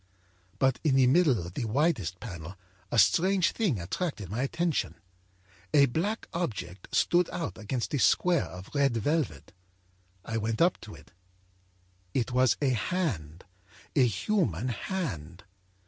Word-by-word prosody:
âBut 130 -1 +3
in 145 -5 +3
the 135 -1 +5
middle 140 -1 +4
of 85 -1 -6
the 120 - -3
widest 110 - 0
panel 90 -4 -8 0.3
a 120 - -1
strange 180 - +4
thing 185 - 0
attracted 100 - -4
my 115 +4 -2
attention. 170 +3 -1 0.8
A 140 -1 +7
black 175 - -2
object 100 - -4
stood 175 0 +3
out 170 - -4
against 115 +6 -3
a 145 - +1
square 175 - +3
of 90 +4 -10
red 140 -5 +2
velvet. 145 0 -1 0.7
I 115 - -2
went 110 0 -2
up 175 +2 +3
to 110 - -10
it; - - -17 1.0
it 125 0 0
was 130 0 +3
a 140 - +3
hand, 105 - -2 0.5
a 130 -3 +5
human 120 - 0
hand. 100 - -4
125 Hz, 140 wpm, -29 LUFS, 100-165 Hz, 1.0 s, A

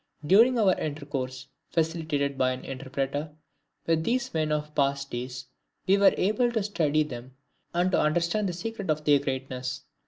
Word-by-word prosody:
During 230 +9 +6
our 200 -5 +4
intercourse, 140 -4 -4 0.2
facilitated 155 -4 0
by 130 -1 +2
an 130 - -8
interpreter, 135 +3 -3 0.5
with 165 -1 +2
these 250 +5 -1
men 155 -1 0
of 150 0 -2
past 140 -1 0
days, 125 +1 -5 0.4
we 195 - +5
were 200 0 +5
able 240 +5 +2
to 220 -3 +1
study 155 -7 +1
them 130 -2 -9 0.4
and 175 +2 +1
to - - +3
understand 175 +6 +1
the - - -3
secret 200 +2 -5
of 155 0 +1
their 145 -1 +5
greatness. 130 -2 -4
150 Hz, 160 wpm, -27 LUFS, 135-180 Hz, 0.5 s, During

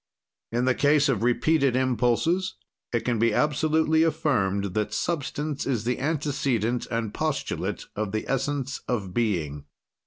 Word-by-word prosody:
"In 120 +2 +1
the 130 - +4
case 145 +2 +3
of 120 -6 +1
repeated 135 +3 +2
impulses, 130 +9 +1 0.4
it 115 - +1
can 120 -3 -1
be 115 -1 +3
absolutely 155 +1 +2
affirmed 100 - +1
that 105 0 -1
substance 150 -1 -2
is 120 -6 0
the 125 +2 -1
antecedent 135 -6 0
and 115 -3 -2
postulate 155 -2 -2
of 105 -1 -2
the 110 +1 -3
essence 135 0 -1
of 100 -7 -2
being. 80 -11 -1
125 Hz, 135 wpm, -26 LUFS, 110-150 Hz, 0.4 s, the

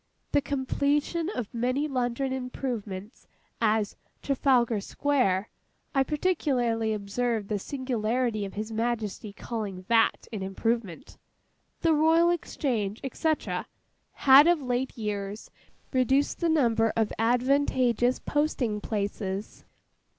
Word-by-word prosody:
The 285 - +3
completion 285 +4 0
of 245 - -5
many 255 +5 0
London 260 0 -1
improvements, 235 -5 -5 0.3
as 215 -2 +1 0.3
Trafalgar 250 -5 +2
Square 225 -6 0 0.4
(I 270 - +3
particularly 265 -8 0
observed 215 +1 -2
the 210 -2 0
singularity 240 -2 -1
of 195 - -6
His 215 +2 -4
Majesty's 220 -3 -2
calling 200 -6 -5
that 225 -1 +3
an 210 - -3
improvement), 195 -1 -3 0.6
the 330 -1 +4
Royal 325 +3 +4
Exchange, 235 - -2
&c., 320 - +1 0.8
had 275 +3 +7
of 345 -2 +4
late 250 +1 -2
years 205 -1 -4 0.4
reduced 265 +2 +2
the 340 - +1
number 230 -8 +3
of 220 -2 +1
advantageous 250 0 +2
posting 260 -8 -1
places. 200 -1 -4
240 Hz, 105 wpm, -27 LUFS, 215-275 Hz, 0.8 s, had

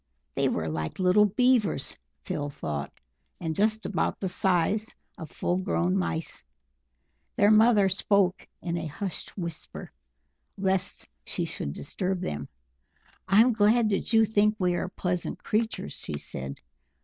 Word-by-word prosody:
They - - +1
were 80 -2 -2
like 80 0 -3
little 190 +3 +5
Beavers, 235 -2 +2 0.3
Phil 145 0 -3
thought, 75 - -4 0.5
and 165 -2 -2
just 215 +5 +1
about - - -1
the 190 - -2
size 190 +5 +1 0.2
of 160 - -7
full 175 - -1
grown 185 -1 0
mice. 170 -4 -2 0.9
Their 205 +1 +5
mother 215 -2 +6
spoke 190 0 +1 0.2
in 170 -1 -2
a 160 -1 -3
hushed 185 +7 -5
whisper 170 -4 -6 0.7
lest 190 -1 -1 0.2
she - - -2
should 70 - -4
disturb 185 - -3
them. 75 - -4 0.8
"I'm 220 +6 +5
glad 215 +1 +4
that 200 +2 -1
you 225 -1 +6
think 210 0 +2
we 180 -3 +1
are 175 - -2
pleasant 180 -2 -3
creatures," 220 - -1
She 75 - -5
said. 65 -1 -6
190 Hz, 135 wpm, -27 LUFS, 165-210 Hz, 0.9 s, mother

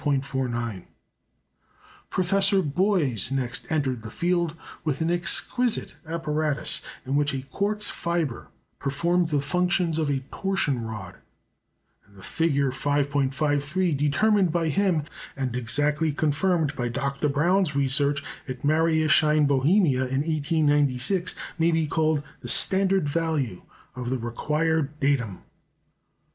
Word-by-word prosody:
Professor 195 +1 +2
Boys 150 - +1
next 130 0 -1
entered 135 -6 0
the 110 - -8
field 170 +3 -1 0.3
with 150 -4 -1
an 165 +1 0
exquisite 220 +7 +1
apparatus, 155 -2 -1 0.2
in 135 +2 -1
which 145 -1 +1
a 130 - -4
quartz 210 +1 +1
fibre 170 -7 -2 0.3
performed 170 +5 0
the 145 -2 +1
functions 175 +2 0
of 155 -2 0
a 135 -2 0
torsion 170 -11 -1
rod; 105 -5 -7 0.9
and 100 0 -24
the 95 - -14
figure 140 -5 0
5·53 145 +4 0
determined 180 +7 +2
by 165 -1 0
him, 175 -1 +1 0.3
and 130 -3 -2
exactly 145 +6 +1
confirmed 155 +1 0
by 125 -3 -2
Dr. 140 +4 -2
Braun's 170 +3 +1
research 140 +1 +2 0.2
at 130 -1 -7
Mariaschein, 155 -1 +3
Bohemia, 140 0 +3
in 135 +2 -1
1896, 150 +1 +1 0.2
may 165 +1 +3
be 160 -1 +1
called 155 -1 0 0.2
the - - -9
standard 190 -4 +3
value 145 - -1 0.3
of 125 -1 -4
the 130 - 0
required 150 +5 -1
datum. 130 -9 0
150 Hz, 115 wpm, -25 LUFS, 140-170 Hz, 0.9 s, Mariaschein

